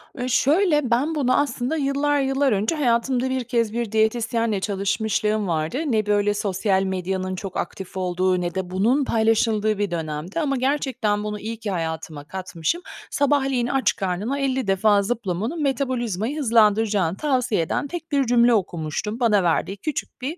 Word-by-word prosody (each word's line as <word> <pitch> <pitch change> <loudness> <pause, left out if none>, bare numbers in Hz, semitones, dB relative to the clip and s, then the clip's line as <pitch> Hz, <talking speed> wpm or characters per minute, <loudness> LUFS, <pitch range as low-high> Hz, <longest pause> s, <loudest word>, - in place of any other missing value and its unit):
Ü 255 -1 -3
şöyle, 295 0 +2
ben 280 +7 +1
bunu 260 -4 +2
aslında 280 0 -1
yıllar 290 0 +1
yıllar 270 0 +1
önce 210 +8 +1
hayatımda 255 -1 +1
1 260 -1 -1
kez 230 -3 0
bir 235 -2 -2
diyetisyenle 220 -1 +1
çalışmışlığım 210 +1 0
vardı. 160 +6 -1
Ne 220 -5 +1
böyle 205 0 +2
sosyal 195 -1 0
medyanın 185 0 -2
çok 190 0 -6
aktif 190 0 -5
olduğu 185 0 0
ne 175 -1 -3
de 190 -1 -3
bunun 225 +10 +2
paylaşıldığı 220 -2 +2
bir 205 -2 -1
dönemdi 160 - -4
ama 280 -4 0
gerçekten 255 -6 0
bunu 210 0 -4
iyi 225 +2 -5
ki 215 -3 -4
hayatıma 160 -3 -4
katmışım. 185 - -3 0.3
Sabahleyin 270 -3 +1
aç 270 +1 +1
karnına 195 +9 -2
50 265 -4 -1
defa 200 +1 +3
zıplamanın 220 - -2
metabolizmayı 255 - -1
hızlandıracağını 215 - +3
tavsiye 255 - +1
eden 165 - -2
tek 330 +1 -7
bir 280 -2 +2
cümle 240 0 +4
okumuştum. 185 +2 -2
Bana 210 -6 +3
verdiği 175 +3 0
küçük 305 +2 -5
bir 290 +7 -4
220 Hz, 155 wpm, -23 LUFS, 190-260 Hz, 0.3 s, cümle